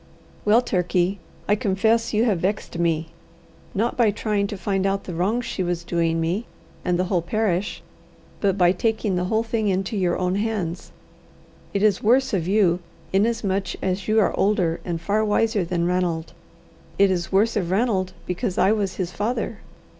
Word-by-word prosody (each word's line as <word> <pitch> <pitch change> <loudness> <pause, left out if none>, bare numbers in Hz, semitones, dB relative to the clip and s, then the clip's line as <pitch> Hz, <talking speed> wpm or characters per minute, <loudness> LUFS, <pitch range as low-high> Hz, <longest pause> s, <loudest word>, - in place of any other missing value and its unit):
"Well, 220 +4 +5
Turkey, 180 -1 0 0.3
I 205 - +4
confess 220 +2 +1
you 215 +1 +2
have 205 -7 +1
vexed 190 -1 -2
me, 165 -1 0 0.7
not 225 +4 0
by 235 -3 +4
trying 205 -1 0
to 205 - -6
find 195 0 0
out 195 0 -1
the 180 - -6
wrong 200 +8 0
she 220 - -4
was 175 -1 -1
doing 165 -1 0
me 175 +8 -1 0.4
and 180 -1 +1
the 180 - +1
whole 185 -1 0
parish, 200 0 -1 0.6
but 195 -2 +1
by 175 -2 +5
taking 215 0 0
the 180 0 0
whole 220 +4 +1
thing 225 -2 -1
into 190 +2 0
your 180 -3 +1
own 185 +1 0
hands. 205 -6 -3 0.8
It 200 0 -1
is 210 -3 +3
worse 250 +4 +3
of 175 -4 0
you, 190 -3 +3 0.3
inasmuch 200 -2 +1
as 190 0 -1
you 220 +1 +3
are 210 - +2
older 190 -5 +1
and 170 -2 -3
far 205 +5 0
wiser 215 -1 +1
than 170 0 -1
Ranald. 175 -2 -1 0.6
It 200 -1 +5
is 175 -2 -2
worse 215 +4 +3
of 185 -5 -1
Ranald 190 -2 +1
because 180 +1 -2
I 195 - +4
was 205 -3 0
his 185 -2 -3
father. 220 +6 -2
195 Hz, 175 wpm, -23 LUFS, 180-215 Hz, 0.8 s, Well